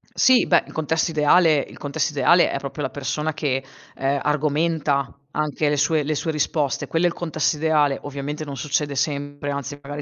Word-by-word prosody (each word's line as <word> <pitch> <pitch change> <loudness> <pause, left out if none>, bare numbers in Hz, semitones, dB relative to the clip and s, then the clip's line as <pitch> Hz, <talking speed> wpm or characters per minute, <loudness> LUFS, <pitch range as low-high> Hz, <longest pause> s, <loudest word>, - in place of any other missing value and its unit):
Sì, 260 -2 +5
beh, 170 - +4
il - - -12
contesto 160 +2 0
ideale 155 +1 +4
il - - -7
contesto 150 +2 -2
ideale 170 +5 +4
è - - -2
proprio 140 +2 -6
la 135 - -1
persona 150 +3 -3
che, 135 -3 -1 0.3
ehm, 135 +1 0
argomenta 150 -1 0 0.2
anche 150 0 -1
le 145 - 0
sue 150 +2 +2
le 155 +1 -1
sue 160 +2 -2
risposte; 150 -2 -1
quello 165 +2 +1
è - - +6
il - - -6
contesto 155 -2 -1
ideale. 150 -3 +2
Ovviamente 145 +2 -5
non 140 -2 -7
succede 145 +1 -1
sempre, 145 -1 -2
anzi 140 0 -5
magari 145 +1 -6
150 Hz, 190 wpm, -22 LUFS, 140-160 Hz, 0.3 s, è